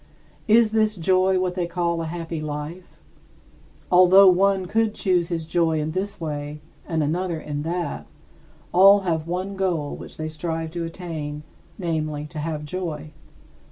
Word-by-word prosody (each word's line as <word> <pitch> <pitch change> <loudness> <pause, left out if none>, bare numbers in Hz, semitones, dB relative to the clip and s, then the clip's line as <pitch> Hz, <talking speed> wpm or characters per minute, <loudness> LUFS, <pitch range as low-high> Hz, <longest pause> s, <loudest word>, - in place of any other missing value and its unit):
Is 220 0 +5
this 215 -1 +2
joy 185 +2 +2
what 185 -1 0
they 180 -2 -2
call 170 -1 -1
a 165 - -3
happy 165 -1 -5
life? 155 +4 -6 0.9
Although 185 +2 +8
one 190 +1 +2
could 220 +3 0
choose 180 -3 +1
his 165 -2 -3
joy 165 -1 +1
in 155 +1 -2
this 190 +4 -3
way 150 -2 -5 0.3
and 160 -2 0
another 170 +2 -1
in 145 -1 -4
that, 170 +3 -3 0.7
all 195 +2 +7
have 165 -4 -1
one 185 +3 -3
goal 175 -7 -1
which - - -10
they 155 - -3
strive 160 +1 -4
to 170 0 -3
attain, 160 -4 -6 0.3
namely, 155 -4 -2
to 155 - -6
have 150 -1 -3
joy. 155 -2 -5
170 Hz, 155 wpm, -23 LUFS, 155-185 Hz, 0.9 s, Although